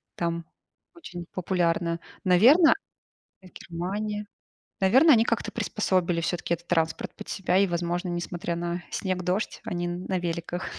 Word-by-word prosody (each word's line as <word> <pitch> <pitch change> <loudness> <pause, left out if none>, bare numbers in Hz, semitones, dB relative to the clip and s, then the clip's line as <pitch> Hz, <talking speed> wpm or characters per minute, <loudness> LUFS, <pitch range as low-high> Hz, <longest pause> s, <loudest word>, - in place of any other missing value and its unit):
Там 170 -1 -2 0.5
очень 180 - -8
популярно. 170 -2 0 0.2
Наверно 250 - +7 0.7
Германия. 200 +4 -5 0.5
Наверное, 260 - +6
они 225 0 +4
как-то - - -1
приспособили 175 -2 0
все-таки 170 0 -1
этот 170 +1 -11
транспорт 165 -2 0
под 210 - -10
себя 185 -2 0
и, 200 - +4
возможно, 175 +1 -2
несмотря 175 0 -3
на 175 +1 -3
снег, 185 -2 -2
дождь, 185 +4 -1
они 175 0 -2
на 180 +2 -2
великах. 175 +1 -3
175 Hz, 130 wpm, -26 LUFS, 170-190 Hz, 0.7 s, Наверно